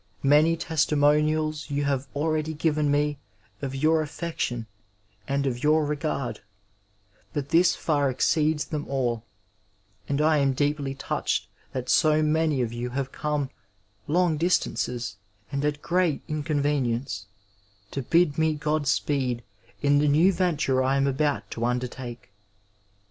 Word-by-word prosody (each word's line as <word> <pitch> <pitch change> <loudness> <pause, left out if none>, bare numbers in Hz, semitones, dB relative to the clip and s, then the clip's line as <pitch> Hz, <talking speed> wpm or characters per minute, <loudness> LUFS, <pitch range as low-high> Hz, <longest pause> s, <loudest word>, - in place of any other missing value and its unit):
Many 150 +4 +5
testimonials 155 -1 +1
you 145 0 -1
have 140 -1 -1
already 155 +1 -1
given 150 -1 +1
me 145 0 +1 0.4
of 135 -1 -4
your 155 +3 +3
affection 150 -6 -3 0.6
and 140 0 0
of 125 -2 -2
your 155 +1 +3
regard, 145 -3 -2 0.9
but 140 -1 -3
this 170 +1 +4
far 145 -3 +1
exceeds 150 +4 +1
them 150 -2 -4
all, 120 -4 -1 0.9
and 140 0 0
I 155 0 +4
am 135 -1 +2
deeply 145 0 -1
touched 135 - -2 0.2
that 130 -1 -4
so 155 -1 +4
many 155 -3 +2
of 115 -1 -3
you 120 +1 -3
have 135 +1 -3
come 150 -3 -2 0.6
long 170 0 +2
distances, 125 - 0 0.3
and 140 0 -2
at 150 0 -1
great 175 -4 +1
inconvenience, 140 -8 -1 0.6
to 140 - -3
bid 160 +2 +2
me 160 -1 +2
Qod 150 -1 -1
speed 130 -4 0 0.4
in 145 0 +4
the 150 - +2
new 160 +7 +4
venture 155 -8 +1
I 135 +1 +2
am 135 - +2
about 140 +1 0
to 115 - -4
undertake. 125 -2 -3
145 Hz, 135 wpm, -26 LUFS, 135-155 Hz, 0.9 s, Many